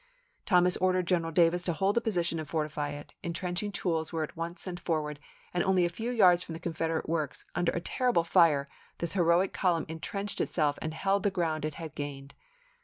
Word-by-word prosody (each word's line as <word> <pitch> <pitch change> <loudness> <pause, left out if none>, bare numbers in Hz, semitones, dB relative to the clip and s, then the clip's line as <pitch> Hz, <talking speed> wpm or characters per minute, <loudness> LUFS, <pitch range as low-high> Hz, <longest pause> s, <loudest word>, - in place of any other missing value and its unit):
Thomas 180 -2 +4
ordered 185 -1 +2
General 170 -2 +1
Davis 170 +1 +4
to 175 - +1
hold 195 +5 +1
the 235 - +3
position 175 -7 0
and 155 - -6
fortify 150 -2 -2
it; 145 0 -8
intrenching 180 +3 -3
tools 165 -5 -1
were 165 -2 -1
at 155 - -7
once 170 +2 -4
sent 180 -2 -5
forward, 150 -4 -2 0.3
and 175 - +1
only 185 -2 +3
a - - +1
few 225 +7 -4
yards 185 -8 +5
from 170 - -6
the 160 - -6
Confederate 165 -1 -2
works, 155 -4 -2
under 175 0 +1
a - - -1
terrible 245 -4 +1
fire, 165 -5 +4 0.3
this 170 -1 -3
heroic 175 0 +3
column 175 -4 +1
intrenched 195 +6 -3
itself 150 -3 +1
and 155 0 -4
held 195 +3 +1
the 205 - +2
ground 165 -5 -1
it 155 -1 -4
had 160 -3 -7
gained. 140 -1 -6
170 Hz, 200 wpm, -30 LUFS, 160-185 Hz, 0.3 s, yards